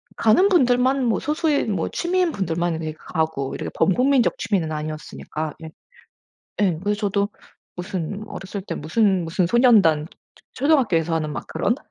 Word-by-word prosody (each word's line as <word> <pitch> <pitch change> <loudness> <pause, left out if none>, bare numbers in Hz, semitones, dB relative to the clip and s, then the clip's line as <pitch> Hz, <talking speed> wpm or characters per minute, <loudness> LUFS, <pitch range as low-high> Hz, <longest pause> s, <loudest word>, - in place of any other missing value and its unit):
가는 360 - +4
분들만 260 -5 +3
뭐 225 -5 +1
소수의 300 -1 0
뭐 195 -6 -1
취미인 355 -1 0
분들만 175 - -1
인제 160 -1 -5
가고 160 -6 -2
이렇게 - - -4
범국민적 250 +6 +2
취미는 175 -7 -1
아니었으니까 155 0 -5
예. 160 - -7 0.9
예. 185 -6 +2
그래서 205 +1 -1
저도 200 0 +1 0.5
무슨 190 +2 -4
어렸을 190 0 -7
때 - - -3
무슨, 190 +4 +1
무슨 170 +2 0
소년단 200 - +4
초 - - -18 0.5
초 260 - -4
초등학교에서 190 - +2
하는 155 -2 -2
막 120 - -6
그런, - - -1
195 Hz, 350 characters per minute, -22 LUFS, 160-245 Hz, 0.9 s, 가는